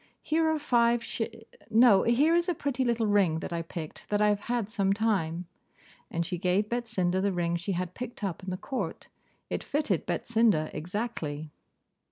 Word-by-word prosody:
Here 320 +1 +2
are 315 - +2
five 240 -5 +2
sh - - -4 0.5
no, 220 -3 +6
here 275 +8 +3
is 345 +1 +2
a 350 - +1
pretty 275 -3 -1
little 235 -2 +1
ring, 200 -6 +3
that 170 - -5
I 170 - -1
picked 165 -1 -8
that 205 - +1
I 210 0 +4
have 205 -1 +2
had 235 -1 -1
some 200 -3 +1
time.' 185 -6 0 0.6
And 170 0 -1
she 180 0 -3
gave 185 +4 +1
Betsinda 205 -7 0
the 200 0 +1
ring 170 -2 0
she 175 +3 -2
had 180 0 -3
picked 245 -1 -7
up 190 -3 -2
in 190 - -6
the 185 - -2
court. 260 +7 -4 0.4
It - - -2
fitted 280 - -1
Betsinda 220 -9 +2
exactly. 160 -4 -4
205 Hz, 185 wpm, -29 LUFS, 175-235 Hz, 0.6 s, no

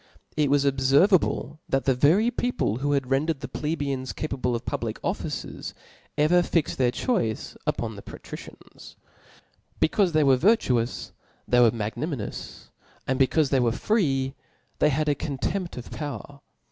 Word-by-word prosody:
— - - -37
It 150 -2 +2
was 140 0 +3
obferva 140 +8 +5
ble 150 +2 -4
that 135 0 +1
the 135 - +4
very 165 - +4
people 245 - -1
who 145 +2 0
had 135 -2 -1
rendered 145 +2 +1
th^ 135 - -7
ple 150 - -3
beians 135 -3 -3
capable 130 -5 -2
of 115 - -5
public - - -3
offices^ - - -4 0.4
ever 160 +4 +4
fixied 170 -2 0
their 125 -2 +3
choice 120 - -1
upon - - -1
the - - -9
patricians. - - -11 0.8
Becaufe 185 +2 +3
they 155 -1 +3
were 135 -2 +5
virtuous, 130 - +1 0.4
they 125 - +4
were 120 -2 +7
magnanimous; 115 +3 -5 0.3
and 130 +1 -1
becaufe 140 +2 +3
they 135 - +4
were 120 -2 +2
free, 135 - 0 0.5
they 150 - +4
had 150 +2 0
a 145 - +4
contempt 155 +6 -3
of 120 - -8
power. 145 -1 -6
140 Hz, 160 wpm, -26 LUFS, 130-155 Hz, 0.8 s, were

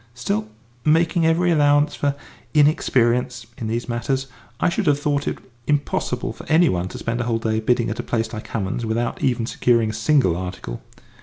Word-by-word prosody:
"Still, 110 -3 -2 0.3
making 165 +1 +3
every 175 +2 +3
allowance 145 -1 +3
for 140 -1 -1 0.4
inexperience 125 -5 +2
in 115 - -3
these 115 +2 -2
matters, 130 +3 -1 0.3
I - - +2
should 180 +2 0
have 145 -1 +3
thought 145 -1 -1
it - - -1 0.3
impossible 145 -1 -1
for - - -11
any 165 +2 +5
one 90 0 -1
to - - -8
spend 120 +1 -2
a - - -2
whole 115 -1 +1
day 110 -1 -1
bidding 120 0 +1
at 110 - -5
a - - +1
place 115 -1 -2
like 110 - -6
Hammond's 105 +2 -3
without 115 +1 -2
even 120 -3 +1
securing 115 -2 +2
a - - -8
single 110 - +2
article." 90 -9 -6
120 Hz, 185 wpm, -22 LUFS, 110-145 Hz, 0.4 s, any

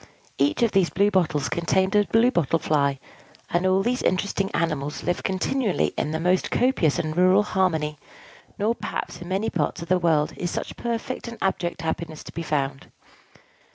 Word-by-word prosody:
Each 145 +11 +2
of 230 - +3
these 195 -3 +3
blue 200 +3 +2
bottles 155 -7 +1
contained 190 +3 +1
a 205 0 +5
Blue 230 +4 +3
Bottle 165 - +1
Fly; 145 -3 +1 0.5
and 175 +2 +2
all 190 +1 +3
these 250 +3 0
interesting 195 +1 0
animals 150 -3 -2
live 175 0 -1
continually 195 +3 0
together - - -2
in - - -4
the 160 - -2
most 180 +2 +1
copious 245 - +2
and 155 0 -2
rural 185 +3 +5
harmony: 160 -7 0 0.6
nor 220 +2 +1
perhaps - - -5
in 175 - -7
many 195 +4 -1
parts 165 0 -1
of 170 - -11
the 185 0 +3
world 160 -3 +2
is 175 - -2
such - - -4
perfect 235 +1 -4
and 235 -1 -7
abject 175 -3 -1
happiness 160 -1 -4
to - - -10
be 170 - -5
found. 140 -4 -2
180 Hz, 185 wpm, -24 LUFS, 155-195 Hz, 0.6 s, a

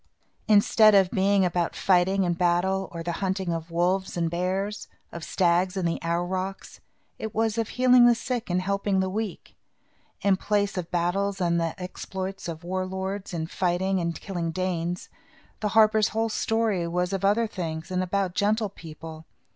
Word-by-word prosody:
Instead 215 0 +6
of 190 -2 +4
being 195 0 +3
about 175 -1 -1
fighting 190 +1 +2
and 175 -1 0
battle, 180 +2 +1
or 170 -1 -6
the 170 - -2
hunting 190 -2 -1
of 165 0 -5
wolves 180 +3 0
and 165 -1 0
bears, 190 +4 -2 0.2
of 170 - -7
stags 180 +2 +1
and 180 -2 0
the 165 - -2
aurochs, 185 +3 -3 0.4
it 220 -1 -5
was 220 -1 +1
of 230 -2 -1
healing 250 -1 +5
the 240 - +5
sick 240 -1 -3
and 180 +1 0
helping 200 0 0
the 190 0 0
weak. 215 -2 -5 0.7
In 195 -2 +3
place 205 0 0
of 180 -3 -4
battles 190 +3 0
and 170 -2 +1
the 165 +3 -3
exploits 190 +1 -6
of 165 0 -6
war 185 +2 -2
lords, 190 +1 -4
in 165 -3 -3
fighting 185 +2 0
and 170 -1 -2
killing 175 -4 -3
Danes, 175 0 -2 0.5
the 215 - -1
harper's 215 -1 +5
whole 225 +1 -1
story 220 -5 0
was 180 +2 -1
of 195 0 -2
other 210 +4 +3
things 165 -5 -5
and 185 0 0
about 185 0 -1
gentle 210 +2 +1
people. 160 -3 -10
190 Hz, 170 wpm, -26 LUFS, 175-200 Hz, 0.7 s, Instead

